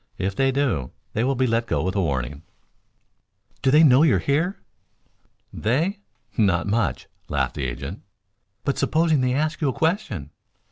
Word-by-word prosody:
If 95 Hz, +1 st, -2 dB
they 135 Hz, +3 st, +2 dB
do, 130 Hz, -, 0 dB, 0.2 s
they 110 Hz, -, 0 dB
will 135 Hz, +2 st, +1 dB
be 130 Hz, +1 st, +2 dB
let 115 Hz, 0 st, 0 dB
go -, -, 0 dB
with 95 Hz, +2 st, -2 dB
a 100 Hz, -, +2 dB
warning." 70 Hz, -3 st, -2 dB, 1.2 s
"Do 135 Hz, -, +2 dB
they 150 Hz, +4 st, +6 dB
know 135 Hz, -2 st, +6 dB
you're 150 Hz, -11 st, +5 dB
here?" 155 Hz, -, 0 dB, 1.0 s
"They? 160 Hz, -, 0 dB, 0.4 s
Not 95 Hz, -6 st, +2 dB
much," 105 Hz, 0 st, 0 dB, 0.2 s
laughed -, -, 0 dB
the 70 Hz, -, -3 dB
agent. 70 Hz, -, -6 dB, 0.6 s
"But 140 Hz, -, -1 dB
supposing 160 Hz, -3 st, +2 dB
they 125 Hz, 0 st, +1 dB
ask 155 Hz, +2 st, -1 dB
you 145 Hz, -, +2 dB
a -, -, -1 dB
question?" 160 Hz, -, -1 dB
125 Hz, 160 wpm, -23 LUFS, 95-150 Hz, 1.2 s, they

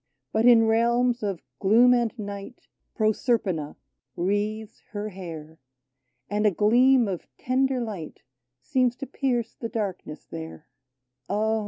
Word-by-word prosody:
But 220 Hz, +2 st, +3 dB
in 230 Hz, -2 st, +7 dB
realms 235 Hz, +2 st, +2 dB
of 195 Hz, -5 st, -3 dB, 0.2 s
gloom 235 Hz, +5 st, +5 dB
and 240 Hz, -2 st, +1 dB
night 205 Hz, +2 st, -8 dB, 0.3 s
Proserpina 215 Hz, -, 0 dB, 0.4 s
wreathes 210 Hz, +4 st, -2 dB
her 210 Hz, 0 st, -3 dB
hair, 160 Hz, -5 st, -9 dB, 0.7 s
And 210 Hz, +1 st, +1 dB
a -, -, +6 dB
gleam 240 Hz, +5 st, +4 dB
of 185 Hz, -3 st, -4 dB
tender 260 Hz, +1 st, +1 dB
light 205 Hz, -9 st, -6 dB, 0.4 s
Seems 250 Hz, -2 st, +1 dB
to 275 Hz, -, -6 dB
pierce 245 Hz, -3 st, -1 dB
the 230 Hz, -, -6 dB
darkness 200 Hz, -9 st, -5 dB
there: 160 Hz, -1 st, -8 dB, 0.3 s
" 125 Hz, 0 st, -49 dB
Ah 220 Hz, +2 st, +1 dB
215 Hz, 130 wpm, -25 LUFS, 195-240 Hz, 0.7 s, in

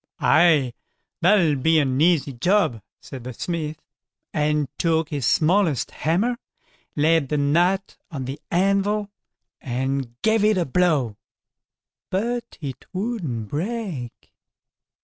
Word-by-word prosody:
"Aye, 155 Hz, -6 st, +4 dB, 0.5 s
that'll 170 Hz, -5 st, +4 dB
be 160 Hz, +5 st, +3 dB
an 135 Hz, -2 st, +1 dB
easy 160 Hz, -5 st, +3 dB
job", 155 Hz, -, +1 dB, 0.2 s
said 130 Hz, -3 st, -9 dB
the 125 Hz, +1 st, -6 dB
smith, 155 Hz, -3 st, -4 dB, 0.5 s
and 150 Hz, -1 st, +1 dB
took 160 Hz, -1 st, +1 dB
his 140 Hz, -6 st, -2 dB
smallest 165 Hz, -, +2 dB
hammer, 210 Hz, +10 st, 0 dB, 0.6 s
laid 155 Hz, -1 st, +2 dB
the 150 Hz, -, 0 dB
nut 175 Hz, +7 st, +1 dB
on 140 Hz, -6 st, -5 dB
the 135 Hz, +4 st, -6 dB
anvil, 200 Hz, +3 st, +1 dB, 0.5 s
and 130 Hz, -1 st, -3 dB
gave 220 Hz, -1 st, +3 dB
it 215 Hz, -1 st, +3 dB
a 175 Hz, -, +1 dB
blow, 140 Hz, -8 st, +1 dB, 0.9 s
but 235 Hz, +5 st, -2 dB
it 135 Hz, -4 st, -6 dB
wouldn't 185 Hz, -, -3 dB
break. 175 Hz, -, -5 dB
160 Hz, 115 wpm, -23 LUFS, 135-190 Hz, 0.9 s, Aye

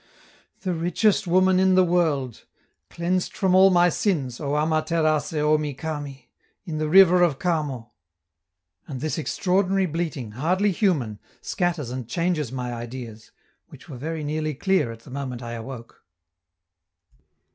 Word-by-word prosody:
"... -, -, -34 dB
The 185 Hz, -2 st, -1 dB
richest 180 Hz, +5 st, +1 dB
woman 185 Hz, +1 st, +4 dB
in 190 Hz, 0 st, +4 dB
the 185 Hz, -, +6 dB
world! 155 Hz, -9 st, 0 dB, 0.4 s
Cleansed 180 Hz, +2 st, -1 dB
from 190 Hz, -3 st, +2 dB
all 190 Hz, +1 st, +7 dB
my 175 Hz, -1 st, +4 dB
sins, 150 Hz, -, -1 dB
O 145 Hz, 0 st, -1 dB
Ama 155 Hz, +1 st, +1 dB
Terace 155 Hz, -3 st, 0 dB
Omi 150 Hz, -1 st, +1 dB
Kami! 145 Hz, -3 st, -6 dB, 0.3 s
in 155 Hz, -4 st, -4 dB
the 155 Hz, 0 st, -1 dB
river 180 Hz, 0 st, +7 dB
of 165 Hz, -6 st, +3 dB
Kamo." 145 Hz, -9 st, -2 dB, 1.0 s
And 135 Hz, -4 st, -6 dB
this 155 Hz, +4 st, -2 dB
extraordinary 190 Hz, +4 st, +1 dB
bleating, 155 Hz, -8 st, -4 dB
hardly 180 Hz, -, +1 dB
human, 150 Hz, -, 0 dB, 0.2 s
scatters 170 Hz, -8 st, -2 dB
and 125 Hz, -2 st, -6 dB
changes 165 Hz, -3 st, -1 dB
my 125 Hz, -2 st, -4 dB
ideas, 120 Hz, -2 st, -8 dB, 0.4 s
which -, -, -15 dB
were 135 Hz, -, -7 dB
very 160 Hz, +4 st, -4 dB
nearly 155 Hz, 0 st, -2 dB
clear 190 Hz, -5 st, +1 dB
at 115 Hz, 0 st, -11 dB
the 125 Hz, -, -14 dB
moment 130 Hz, -3 st, -5 dB
I 120 Hz, -, -6 dB
awoke. 120 Hz, 0 st, -9 dB
155 Hz, 145 wpm, -24 LUFS, 130-180 Hz, 1.0 s, all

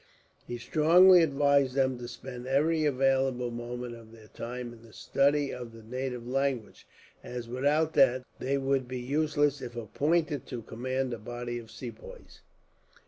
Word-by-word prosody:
He 120 Hz, -, -4 dB
strongly 170 Hz, +8 st, +6 dB
advised 140 Hz, -3 st, +3 dB
them 130 Hz, -2 st, +1 dB
to 120 Hz, -, -6 dB
spend 125 Hz, 0 st, -8 dB
every 155 Hz, +4 st, +2 dB
available 135 Hz, -3 st, +1 dB
moment 120 Hz, +1 st, -5 dB
of 115 Hz, -1 st, -13 dB
their 110 Hz, -2 st, -15 dB
time 120 Hz, 0 st, -6 dB
in 115 Hz, -, -15 dB
the 115 Hz, -2 st, -17 dB
study 140 Hz, +1 st, +1 dB
of 120 Hz, -2 st, -7 dB
the 115 Hz, -1 st, -12 dB
native 125 Hz, +1 st, -4 dB
language; 135 Hz, -3 st, -2 dB, 0.4 s
as, 120 Hz, -1 st, -6 dB
without 145 Hz, +6 st, +1 dB
that, 130 Hz, -1 st, +4 dB, 0.2 s
they 135 Hz, +2 st, 0 dB
would 135 Hz, -1 st, 0 dB
be 130 Hz, 0 st, -4 dB
useless 145 Hz, +1 st, +1 dB
if 120 Hz, -2 st, -7 dB
appointed 145 Hz, -, 0 dB
to 120 Hz, -3 st, -6 dB
command 130 Hz, +3 st, -3 dB
a 115 Hz, -, -5 dB
body 120 Hz, +2 st, -5 dB
of 115 Hz, -1 st, -12 dB
Sepoys. 305 Hz, -, -10 dB
130 Hz, 155 wpm, -29 LUFS, 120-140 Hz, 0.4 s, strongly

